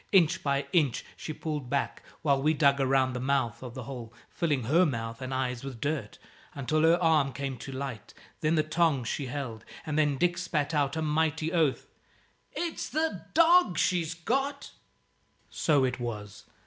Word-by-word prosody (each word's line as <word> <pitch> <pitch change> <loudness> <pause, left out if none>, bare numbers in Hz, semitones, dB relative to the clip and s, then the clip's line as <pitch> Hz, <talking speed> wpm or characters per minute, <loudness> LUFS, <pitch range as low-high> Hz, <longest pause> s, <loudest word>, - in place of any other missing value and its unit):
Inch 175 -2 +4
by 140 -1 0
inch 150 -8 +2
she - - -6
pulled 150 -4 -4
back, 140 - -1 0.2
while 140 -3 +3
we 155 +3 +2
dug 140 -1 +4
around 130 -1 +2
the 125 - -3
mouth 130 -3 0
of 125 -1 -8
the 130 - -5
hole, 120 -3 -7 0.2
filling 145 -7 0
her 155 +10 +4
mouth 115 -6 -2
and 130 0 -5
eyes 130 -2 -2
with 135 -4 -7
dirt, 140 -5 -3 0.4
until 145 +3 0
her 165 +2 +5
arm 155 -5 +3
came 135 -1 -4
to 135 - -7
light, 130 -5 -6 0.3
then 155 +1 +2
the 155 - +3
tongs 155 -5 +1
she 135 +1 -2
held; 125 -5 -5 0.2
and 155 0 -1
then 145 -3 +2
Dick 175 +2 +1
spat 155 -4 -1
out 145 -1 +1
a 160 - -1
mighty 160 +1 0
oath 160 -6 +2 0.7
"It's 340 -2 -3
the 315 +1 -2
dog 335 - +5
she's 165 -3 +1
got!" 270 - -2 0.8
So 145 -4 +2
it 125 0 -2
was. 105 -4 -6
140 Hz, 175 wpm, -29 LUFS, 130-160 Hz, 0.8 s, her